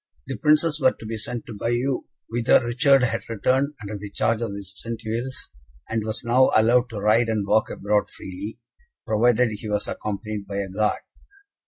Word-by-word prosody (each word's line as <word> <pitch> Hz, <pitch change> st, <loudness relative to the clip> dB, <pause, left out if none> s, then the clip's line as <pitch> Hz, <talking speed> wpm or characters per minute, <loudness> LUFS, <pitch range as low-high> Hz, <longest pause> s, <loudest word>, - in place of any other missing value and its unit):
The -, -, -4 dB
Princes 155 Hz, 0 st, +3 dB
were 130 Hz, -1 st, +5 dB
to -, -, -12 dB
be 110 Hz, +1 st, -4 dB
sent 115 Hz, +2 st, -5 dB
to 115 Hz, -, -8 dB
Bayeux; 120 Hz, +5 st, -1 dB, 0.2 s
whither 120 Hz, +1 st, +3 dB
Richard 135 Hz, +3 st, +4 dB
had 115 Hz, -2 st, -1 dB
returned, 130 Hz, +6 st, +1 dB
under 105 Hz, +1 st, -5 dB
the 105 Hz, 0 st, -7 dB
charge 110 Hz, +2 st, 0 dB
of 115 Hz, -, -2 dB
the 100 Hz, 0 st, -6 dB
Centevilles, 115 Hz, +5 st, -5 dB, 0.4 s
and 110 Hz, -1 st, -1 dB
was 110 Hz, +1 st, -3 dB
now 125 Hz, +3 st, +4 dB
allowed 120 Hz, +3 st, +4 dB
to 110 Hz, -3 st, -5 dB
ride 110 Hz, +3 st, +3 dB
and 110 Hz, -3 st, 0 dB
walk 110 Hz, +2 st, +2 dB
abroad 105 Hz, +1 st, 0 dB
freely, 100 Hz, +4 st, -7 dB, 0.5 s
provided 120 Hz, +2 st, +3 dB
he 105 Hz, 0 st, -6 dB
was 105 Hz, 0 st, -1 dB
accompanied 105 Hz, 0 st, -4 dB
by 100 Hz, 0 st, -4 dB
a 100 Hz, -1 st, -2 dB
guard. 105 Hz, +3 st, 0 dB
115 Hz, 180 wpm, -24 LUFS, 105-120 Hz, 0.5 s, were